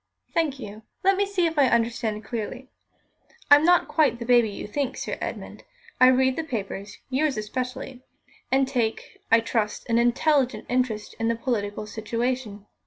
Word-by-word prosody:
"Thank 310 -5 0
you. 210 -3 -8 0.2
Let 390 +1 +4
me 400 +1 +1
see 385 -3 +1
if 325 -2 0
I 275 - +6
understand 230 -2 0
clearly. 245 +3 -5 0.8
I'm 290 +1 +8
not 355 +1 +4
quite 305 -6 +2
the 235 - -6
baby 240 -2 +4
you 200 - -7
think, 270 +4 -3
Sir - - -3
Edmund. - - -6 0.4
I 255 - +8
read 260 0 +3
the 325 - -1
papers 205 -7 -5
yours 275 -1 +1
especially 250 +3 -5 0.5
and 270 0 +3
take, 240 -4 -2
I 225 0 +6
trust, 225 -2 -2
an 230 0 +3
intelligent 255 +2 +2
interest 245 -4 -1
in 225 - 0
the 230 - +1
political 210 -4 -2
situation. 220 0 -3
245 Hz, 165 wpm, -25 LUFS, 220-270 Hz, 0.8 s, I'm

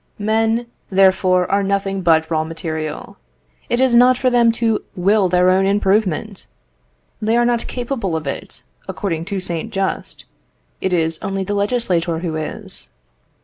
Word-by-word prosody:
Men, 225 +2 +1 0.2
therefore, 185 -1 +4
are 200 - +3
nothing 195 0 -1
but 160 -2 +3
raw 155 -1 +1
material. 160 -2 -5 0.5
It 240 - +1
is 260 -2 +3
not 250 +1 +6
for 255 0 +1
them 235 -1 +5
to 225 -2 0
will 195 +1 +3
their 180 +1 +4
own 190 +1 +3
improvement. 200 -1 0 0.7
They 220 +2 +2
are 240 - +3
not 240 -1 0
capable 240 -8 -3
of 160 -1 -3
it; 140 - -3 0.2
according 165 -5 -3
to 200 +1 -3
Saint 170 -3 -3
Just, 195 -1 -2 0.6
it 190 - 0
is 165 -2 +1
only 195 -1 -2
the 205 - -3
legislator 200 -6 0
who 165 -1 -3
is. 155 -1 -5
195 Hz, 150 wpm, -19 LUFS, 170-220 Hz, 0.7 s, not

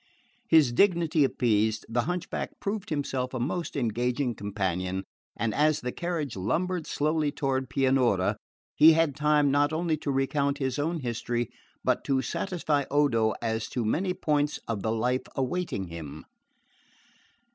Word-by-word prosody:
His 155 -6 +6
dignity 170 0 +3
appeased, 110 -4 +1
the 120 +1 0
hunchback 180 0 -4
proved 200 0 -3
himself 135 -4 -2
a - - -2
most 155 +7 -2
engaging 125 +1 0
companion, 95 -3 -2 0.3
and 110 0 -1
as 155 0 +3
the 125 - -3
carriage 165 -5 -3
lumbered 170 - -1
slowly 150 0 0
toward 130 -2 -1
Pianura 130 -8 +2 0.4
he 160 +2 +8
had 160 -3 +2
time 150 -1 +3
not 145 +1 +3
only 160 0 0
to 150 - -5
recount 140 +1 0
his 135 0 -2
own 160 +2 -1
history 120 -1 -2 0.3
but - - +1
to 135 -1 +1
satisfy 155 -6 -1
Odo 120 -7 +2
as 110 -1 -1
to 120 -3 -2
many 180 - 0
points 150 -3 0
of 110 -4 -2
the 110 - -1
life 125 +3 0
awaiting 135 - -2
him. 80 -3 -8
135 Hz, 145 wpm, -28 LUFS, 115-155 Hz, 0.4 s, he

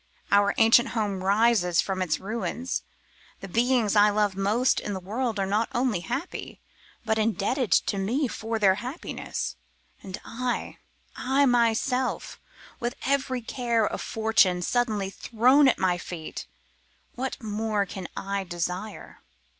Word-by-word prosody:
Our 200 0 +4
ancient 225 +1 +6
house 205 -5 -2
rises 200 -3 +3
from 190 -1 0
its 160 -4 0
ruins; 235 +5 -3 0.6
the 195 - -8
beings 230 +1 +2
I 205 0 +6
love 205 -2 +1
most 210 +6 +2
in 205 - -4
the - - -4
world 220 +4 -2
are 195 - +1
not 210 +4 0
only 240 -6 +1
happy, 175 - -5 0.5
but 220 0 +1
indebted 220 +3 0
to 200 - +2
me 250 +9 0
for 225 0 -3
their 200 -3 +5
happiness; 255 +7 -5 0.4
and 190 0 -7
I, 250 +1 -3 0.4
I 270 +2 +2
myself, 245 +1 +1 0.4
with 240 0 -2
every 265 -2 0
gift 235 -2 0
of - - -4
fortune 220 -5 +2
suddenly 215 -4 0
thrown 250 +8 +4
at 260 - +3
my 180 -2 +1
feet, 165 -3 -7 0.7
what 260 +1 -4
more 215 -1 -1
can 185 -1 -7
I 195 0 -2
desire? 180 +4 -5
220 Hz, 140 wpm, -26 LUFS, 195-245 Hz, 0.7 s, ancient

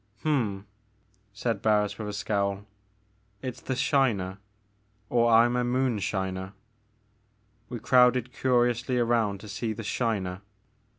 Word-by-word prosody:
'*Hml" 115 -10 0 0.7
said 115 +3 -2
Barris 105 -1 +1
with 105 - -4
a - - -5
scowl, 100 0 -1 0.8
it's 130 -2 -5
the 130 - -3
'Shiner,' 105 -10 +1 0.7
or 120 -1 +3
I'm 120 +2 +5
a 125 - +1
moonshiner.*' 100 -7 -1 1.2
We 120 - -4
crowded 125 0 +4
curiously 125 -1 +1
around 115 -5 +1
to 110 - -10
see 110 +2 -3
the 115 - -7
"Shiner." 100 -5 -2
115 Hz, 115 wpm, -27 LUFS, 100-125 Hz, 1.2 s, I'm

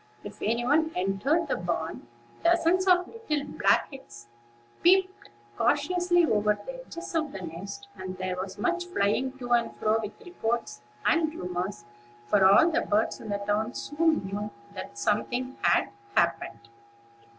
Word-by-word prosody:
If - - -10
any 235 +3 0
one 315 +4 +3
entered 205 - +1
the - - 0
barn, 165 -6 -3 0.4
dozens 345 +2 +3
of 360 -1 +4 0.2
little 295 -2 +1
black - - +2
heads 120 - -12 0.5
peeped 380 +2 +3 0.3
cautiously 350 - +2
over 210 -5 +2
the - - -7
edges 340 -7 -8
of 315 -3 0
the 195 - -7
nests, 195 - -7
and 185 0 -7
there 185 0 -2
was 185 +1 -5
much 355 0 -1
flying 260 - 0
to 245 -2 -7
and 235 -1 +2
fro 220 +1 +1
with 210 -1 -7
reports 230 - -3 0.2
and 320 -1 +3
rumors; 180 - -4 0.4
for 195 +10 +3
all 200 - +7
the - - +2
birds 215 +2 0
in 215 - -8
the 205 - 0
town 210 +3 -1
soon 315 -5 +1
knew 205 +2 -4 0.2
that 115 - -8
something 245 - -1
had - - +3 0.3
happened. - - 0
235 Hz, 150 wpm, -28 LUFS, -, 0.5 s, all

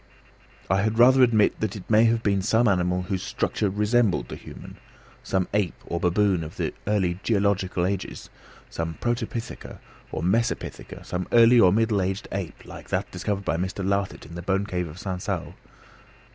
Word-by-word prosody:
I 95 +2 +2
had 110 +2 0
rather 130 +3 +6
admit 115 -4 +4
that 110 -2 -2
it 100 - -9
may 110 +1 +5
have 115 0 +2
been 100 -2 +2
some 115 +4 +2
animal 90 -2 +1
whose 95 0 -3
structure 105 - -1
resembled 105 - +1
the - - -6
human, - - -11 0.4
some 95 -2 -1
ape 100 -5 +1
or 85 - -3
baboon 90 0 +2
of 80 - -9
the - - -2
early 95 -4 +1
geological 100 -4 +1
ages, 95 0 -4 0.4
some 80 0 -4
protopitheca, 120 -1 -4 0.3
or 80 - -4
some 90 - +2
mesopitheca, 115 +3 -2
some 90 0 -3
early 120 +1 +7
or 95 -5 +6
middle 110 0 +2
ape 95 - -4
like - - -11
that - - -2
discovered 95 +2 -3
by 80 - 0
Mr. 95 +2 -3
Lartet 100 -1 -1
in 85 - -12
the 85 - -6
bone 95 +2 0
cave 90 -3 -2
of 75 +2 -10
Sansau. 95 -1 -4
100 Hz, 175 wpm, -25 LUFS, 90-110 Hz, 0.4 s, early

